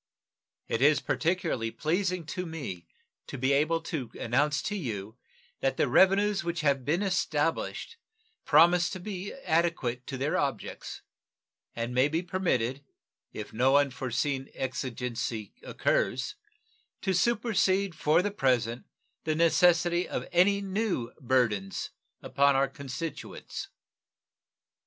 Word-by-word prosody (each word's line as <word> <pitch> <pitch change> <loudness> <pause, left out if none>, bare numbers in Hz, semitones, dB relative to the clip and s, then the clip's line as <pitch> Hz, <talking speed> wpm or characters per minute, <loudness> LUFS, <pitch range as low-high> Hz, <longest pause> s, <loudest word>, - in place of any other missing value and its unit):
It 115 - -1
is 145 +2 +5
particularly 160 -9 -1
pleasing 175 - -1
to 180 +4 -4
me 115 - -6 0.4
to - - -6
be 130 +3 +2
able 155 +4 +2
to 155 -8 -4
announce 145 +4 +1
to 210 - -2
you 110 - -5 0.4
that 135 - 0
the - - +2
revenues 195 +7 +4
which 170 -1 -2
have 140 -3 +2
been 165 +9 0
established 165 - -1 0.5
promise 170 +3 +5
to 185 - -6
be 195 +1 -5
adequate 160 - -1
to 135 - -4
their 140 +3 0
objects, 140 -1 -4 0.7
and 115 +1 -3
may 130 +2 +4
be 160 +4 -1
permitted, 140 -8 -1 0.5
if 105 - -7
no 130 +5 +4
unforeseen 135 0 -1
exigency 125 -4 -3
occurs, - - 0 0.7
to 190 - 0
supersede 200 -2 +2
for 155 +2 +2
the 205 - -1
present 125 - 0 0.4
the 155 -1 0
necessity 170 +1 +3
of - - -3
any 200 +3 +4
new 195 - -2
burthens 115 -7 0 0.3
upon 140 0 +3
our 135 +1 +3
constituents. 140 +3 -6
150 Hz, 120 wpm, -29 LUFS, 130-180 Hz, 0.7 s, is